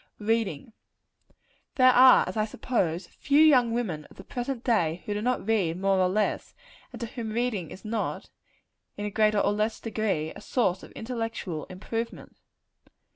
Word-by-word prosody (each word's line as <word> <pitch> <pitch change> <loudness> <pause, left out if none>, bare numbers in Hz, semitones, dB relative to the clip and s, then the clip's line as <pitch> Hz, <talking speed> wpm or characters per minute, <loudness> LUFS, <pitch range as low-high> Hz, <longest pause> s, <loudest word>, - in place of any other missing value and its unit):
Reading. 220 -3 -1 1.0
There 255 -1 +6
are, 255 +1 +7
as - - -5
I 215 - +1
suppose, 185 -6 -1
few 280 +10 0
young 265 -7 +6
women 190 -11 -2
of - - -18
the 190 - -10
present 245 +3 -4
day, 175 -8 +1
who 205 - -2
do 205 - -3
not 250 -1 -1
read 185 -6 +1
more 195 0 +2
or 185 -1 +3
less; 210 +3 -1 0.4
and - - -9
to - - -1
whom 225 -1 -6
reading 225 -8 -1
is 190 - -11
not, 215 0 -3 0.7
in 205 - -4
a 210 - -3
greater 215 0 +2
or 205 - +2
less 215 +2 -1
degree, 205 -8 -2
a - - -11
source 190 -7 0
of - - -13
intellectual 225 -8 -4
improvement. 225 +5 -6
215 Hz, 170 wpm, -27 LUFS, 190-235 Hz, 1.0 s, are